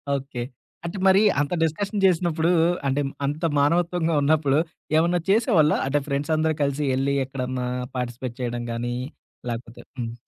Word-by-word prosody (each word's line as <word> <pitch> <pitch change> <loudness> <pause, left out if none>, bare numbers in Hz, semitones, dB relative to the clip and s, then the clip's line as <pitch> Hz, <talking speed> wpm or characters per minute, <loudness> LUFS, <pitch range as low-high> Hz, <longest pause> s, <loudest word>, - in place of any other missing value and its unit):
Okay. 130 -3 -4 0.4
అంటే 170 +4 -4
మరి 190 +1 +6 0.2
అంత 145 +4 -2
డిస్కషన్ 195 +6 -1
జేసినప్పుడు 170 -2 +2 0.4
అంటే 135 +2 +1 0.2
అంత 150 +4 -3 0.2
మానవత్వంగా 170 +3 +1
ఉన్నప్పుడు 145 -2 +3 0.4
ఏమన్నా 175 +2 +2
చేసేవాళ్ళా? 195 - +4
అంటే 145 +2 +1
ఫ్రెండ్స్ 140 +2 -2
అందరూ 155 0 +1
కలిసి 140 +1 -1
యెళ్ళి 135 +2 0
ఎక్కడన్నా 130 -1 -3 0.3
పార్టిసిపేట్ 120 0 -4
చేయడం 120 -1 -3
గానీ. 120 +1 -3 0.5
లేకపోతే 115 0 -6 0.2
హ్మ్. 115 -2 -4
145 Hz, 135 wpm, -24 LUFS, 130-170 Hz, 0.5 s, మరి